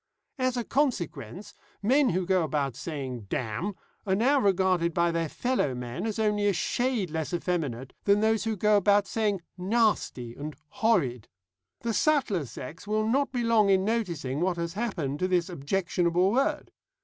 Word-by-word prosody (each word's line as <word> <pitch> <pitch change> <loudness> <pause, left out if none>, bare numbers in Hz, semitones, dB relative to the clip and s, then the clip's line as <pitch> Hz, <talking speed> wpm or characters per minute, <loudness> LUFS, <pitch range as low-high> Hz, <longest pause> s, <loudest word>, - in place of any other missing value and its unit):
As 255 -1 +1
a 240 - 0
consequence, 185 - -2 0.3
men 265 +5 +4
who 180 +1 0
go 185 0 +2
about 140 -5 -1
saying 130 - -5
'damn' 130 - -2 0.3
are 190 -2 +1
now 265 +7 +3
regarded 185 -5 +2
by 170 0 +3
their 165 -1 -1
fellow 245 - 0
men 125 - -4
as 220 - -3
only 210 -2 +1
a 200 - +3
shade 235 0 -1
less 160 +2 -2
effeminate 145 -9 -2
than 200 0 +4
those 220 -1 +2
who 220 -1 0
go 210 +2 +4
about 205 0 +4
saying 210 -4 -1 0.2
'nasty' 190 - 0
and 150 +4 -7
'horrid.' 130 - +1 0.5
The 230 -1 -1
subtler 220 - +1
sex 150 - -9
will 215 +1 +1
not 275 +5 +1
be 245 -2 -1
long 225 -3 +4
in 190 -1 +3
noticing 170 - -1
what 180 -1 +1
has 170 0 -3
happened 180 - -2
to 185 - +1
this 180 -1 +1
objectionable 175 +2 +1
word. 265 +5 0
190 Hz, 165 wpm, -28 LUFS, 160-220 Hz, 0.5 s, men